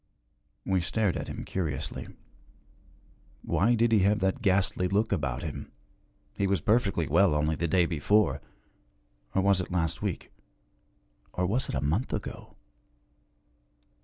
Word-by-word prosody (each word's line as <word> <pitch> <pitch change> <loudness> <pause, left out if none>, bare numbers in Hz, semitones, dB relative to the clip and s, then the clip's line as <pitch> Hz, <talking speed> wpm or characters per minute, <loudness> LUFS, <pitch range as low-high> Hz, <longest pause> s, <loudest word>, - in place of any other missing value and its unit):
We 95 -2 +1
stared 100 +2 0
at - - -4
him - - -6
curiously. 75 -5 -3 1.4
Why 115 +5 +2
did 115 0 +2
he 110 - +5
have 100 +2 +3
that 95 +7 0
ghastly 95 -3 +2
look 105 +4 +1
about 70 -6 -1
him? 80 -3 -6 0.6
He 100 - 0
was 95 -2 +1
perfectly 100 -3 +1
well 85 +1 +4
only 75 +1 +1
the 85 - -1
day 85 +2 +3
before 90 +6 +2 0.9
or 95 - +3
was 100 -2 +4
it 90 - -6
last 85 -3 -1
week - - -4 1.0
or 90 - 0
was 120 +8 0
it - - -2
a 65 - -1
month 80 - -1
ago? - - -6
95 Hz, 140 wpm, -28 LUFS, 80-100 Hz, 1.4 s, he